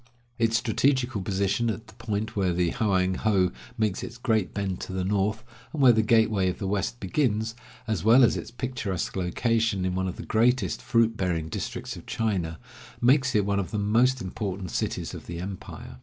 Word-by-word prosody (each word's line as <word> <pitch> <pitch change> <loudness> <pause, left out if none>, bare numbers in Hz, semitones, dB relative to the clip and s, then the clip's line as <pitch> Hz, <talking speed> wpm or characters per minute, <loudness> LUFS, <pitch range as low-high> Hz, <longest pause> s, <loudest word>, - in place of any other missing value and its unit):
Its 115 -1 +3
strategical 125 -1 +1
position 100 +4 0
at 110 +1 -4
the 110 - -16
point 110 0 -3
where 95 -3 +1
the 85 -1 +1
Hoang 95 -4 +1
ho 95 -5 +2 0.3
makes 110 -4 0
its 120 -1 -7
great 110 -6 0
bend 95 -3 -3
to - - -6
the 95 0 -2
north, 105 +3 0 0.3
and 155 - -5
where 130 -3 +8
the 110 -1 +3
gateway 110 -4 +3
of 90 - -4
the 100 - -4
West 100 +4 -1
begins, 110 0 0 0.3
as 110 -7 -2
well 120 +4 +7
as 120 - +4
its - - -5
picturesque 120 -6 -3
location 100 +2 0
in 90 - 0
one 95 +1 -1
of 90 - -4
the - - -8
greatest 120 +3 +2
fruit 115 -1 +2
bearing 85 -5 -1
districts - - -4
of - - -12
China, 95 -8 -1 0.4
makes 130 +1 +3
it 105 -2 +3
one 100 0 +1
of 95 - -3
the 105 - -3
most 120 +5 +2
important 95 -2 -4
cities - - -2
of - - -9
the 85 - -5
empire. 90 -7 -8
105 Hz, 195 wpm, -26 LUFS, 95-115 Hz, 0.4 s, where